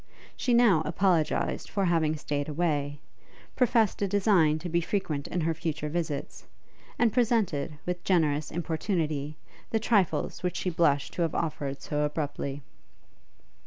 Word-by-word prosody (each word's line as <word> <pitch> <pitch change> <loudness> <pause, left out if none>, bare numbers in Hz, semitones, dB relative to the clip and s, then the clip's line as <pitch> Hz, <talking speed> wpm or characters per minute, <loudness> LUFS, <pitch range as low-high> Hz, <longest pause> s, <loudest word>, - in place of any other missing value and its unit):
She 245 -2 +1
now 225 -10 +5
apologized 170 0 +1
for 195 -1 0
having 160 -3 +2
stayed 145 -1 -3
away, 145 -3 -1 0.6
professed 230 -5 +2
a 200 - +2
design 190 -6 +3
to 175 - -6
be 170 0 +1
frequent 160 -6 -2
in 180 - -2
her 165 +1 +1
future 155 -1 -3
visits, 160 -3 -4 0.5
and 235 -3 +3
presented, 215 - +1
with 180 0 -3
generous 155 -5 +2
importunity, 155 -3 -2 0.3
the 225 - +1
trifles 210 -5 +1
which 180 -1 -2
she 185 - -1
blushed 150 -4 +2
to - - -3
have 165 -2 0
offered 145 -4 -3
so 150 0 -1
abruptly. 145 -2 -3
165 Hz, 140 wpm, -28 LUFS, 150-190 Hz, 0.6 s, now